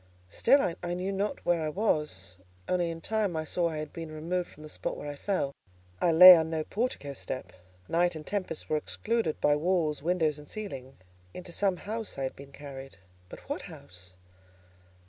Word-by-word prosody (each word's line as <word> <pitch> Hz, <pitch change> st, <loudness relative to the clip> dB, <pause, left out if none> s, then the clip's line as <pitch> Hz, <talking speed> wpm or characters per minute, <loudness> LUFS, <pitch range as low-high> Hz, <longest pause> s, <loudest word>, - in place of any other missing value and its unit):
Still, 250 Hz, -, +3 dB
I 175 Hz, 0 st, -2 dB
knew 185 Hz, +2 st, -2 dB
not 200 Hz, +2 st, -2 dB
where 175 Hz, -2 st, +2 dB
I 155 Hz, -, -1 dB
was; 150 Hz, -, -1 dB, 0.3 s
only 175 Hz, -2 st, +1 dB
in 165 Hz, 0 st, -6 dB
time 215 Hz, -4 st, 0 dB
I 160 Hz, -, -1 dB
saw 170 Hz, +2 st, 0 dB
I 160 Hz, -, -4 dB
had 150 Hz, -1 st, -5 dB
been 165 Hz, -2 st, -6 dB
removed 170 Hz, +3 st, -2 dB
from 150 Hz, -, -14 dB
the -, -, -8 dB
spot -, -, -4 dB
where 145 Hz, -, -7 dB
I 145 Hz, -, -4 dB
fell: 145 Hz, -3 st, -1 dB, 0.5 s
I 170 Hz, -, +4 dB
lay 180 Hz, +3 st, +12 dB
on 160 Hz, -1 st, +1 dB
no 160 Hz, -1 st, -1 dB
portico 205 Hz, -, -3 dB
step; 130 Hz, -1 st, -6 dB, 0.3 s
night 175 Hz, 0 st, +2 dB
and 155 Hz, -1 st, -7 dB
tempest 185 Hz, -6 st, -3 dB
were 155 Hz, -, +1 dB
excluded 220 Hz, +2 st, -1 dB
by 145 Hz, -, +4 dB
walls, 160 Hz, -2 st, +1 dB
windows, 160 Hz, -2 st, +1 dB
and 150 Hz, -, -13 dB
ceiling. 135 Hz, -, -7 dB, 0.4 s
Into 180 Hz, -1 st, -8 dB
some 190 Hz, 0 st, +1 dB
house 220 Hz, -1 st, -5 dB
I 135 Hz, -, -2 dB
had 130 Hz, -, -3 dB
been 140 Hz, 0 st, -12 dB
carried—but 135 Hz, -11 st, -11 dB
what -, -, -4 dB
house? 90 Hz, 0 st, -12 dB
160 Hz, 185 wpm, -29 LUFS, 145-180 Hz, 0.5 s, lay